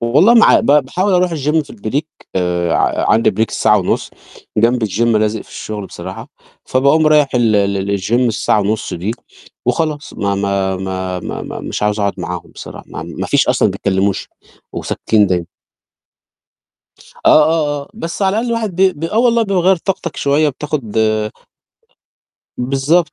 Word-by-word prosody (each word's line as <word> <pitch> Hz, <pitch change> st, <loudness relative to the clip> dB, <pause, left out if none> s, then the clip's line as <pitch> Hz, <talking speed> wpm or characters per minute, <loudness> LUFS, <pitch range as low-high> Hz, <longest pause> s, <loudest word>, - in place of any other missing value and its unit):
والله 150 Hz, -, +4 dB
ما 230 Hz, -, +7 dB
عا -, -, +5 dB
ب -, -, -4 dB
باحاول 150 Hz, +8 st, +2 dB
أروح 180 Hz, 0 st, +3 dB
الgym 150 Hz, +2 st, +1 dB
في -, -, -13 dB
الbreak، 130 Hz, +9 st, -5 dB
آآ، 90 Hz, -2 st, 0 dB
ع -, -, +1 dB
عندي 115 Hz, 0 st, +3 dB
break 110 Hz, +3 st, 0 dB
الساعة 105 Hz, -, +2 dB
ونُص، 90 Hz, -, -1 dB, 0.5 s
جانب 115 Hz, +1 st, +2 dB
الgym، 100 Hz, +1 st, -3 dB
لازِق 110 Hz, -2 st, +1 dB
في -, -, -22 dB
الشُغل 105 Hz, -2 st, -6 dB
بصراحة، 95 Hz, +2 st, -8 dB, 0.4 s
فباقوم 140 Hz, +4 st, +3 dB
رايح 150 Hz, -2 st, +4 dB
ال 115 Hz, -3 st, +3 dB
ل 100 Hz, -1 st, +2 dB
ل 100 Hz, +1 st, -1 dB
لالgym 95 Hz, +5 st, -5 dB
الساعة 115 Hz, -3 st, +1 dB
ونُص 105 Hz, +2 st, -2 dB
دي 90 Hz, +5 st, -3 dB, 0.6 s
وخلاص. 155 Hz, -2 st, -1 dB
ما 100 Hz, -1 st, -1 dB
ما 100 Hz, -1 st, -1 dB
ما 95 Hz, -1 st, -4 dB
ما -, -, -5 dB
ما -, -, -6 dB
-مش -, -, -5 dB
عاوز 105 Hz, 0 st, 0 dB
أقعُد 100 Hz, -1 st, 0 dB
معاهم 90 Hz, -1 st, -6 dB
بصراحة، -, -, -10 dB
ما -, -, -7 dB
ما -, -, -5 dB
فيش -, -, +2 dB
أصلًا -, -, +3 dB
ما -, -, -3 dB
بيتكلّموش 95 Hz, 0 st, -1 dB, 0.4 s
وساكتين 105 Hz, -2 st, +1 dB
دايمًا. 90 Hz, -2 st, -1 dB, 1.8 s
آه، -, -, +5 dB
آه، 150 Hz, -2 st, +1 dB
آه، 140 Hz, -, -16 dB
بس 170 Hz, -3 st, -5 dB
على 195 Hz, +2 st, +2 dB
الأقل 235 Hz, +2 st, -1 dB
الواحد 220 Hz, -6 st, -2 dB
ب 185 Hz, -5 st, +2 dB
ب 165 Hz, -, -3 dB
آه، 215 Hz, +7 st, -1 dB
والله 235 Hz, -1 st, +3 dB
بيغيّر 190 Hz, -2 st, +2 dB
طاقتك 175 Hz, -1 st, -4 dB
شوية 145 Hz, +2 st, +2 dB
وبتاخُد 135 Hz, -6 st, -4 dB, 1.6 s
بالضبط، 140 Hz, +6 st, +1 dB
120 Hz, 170 wpm, -16 LUFS, 100-160 Hz, 1.8 s, ما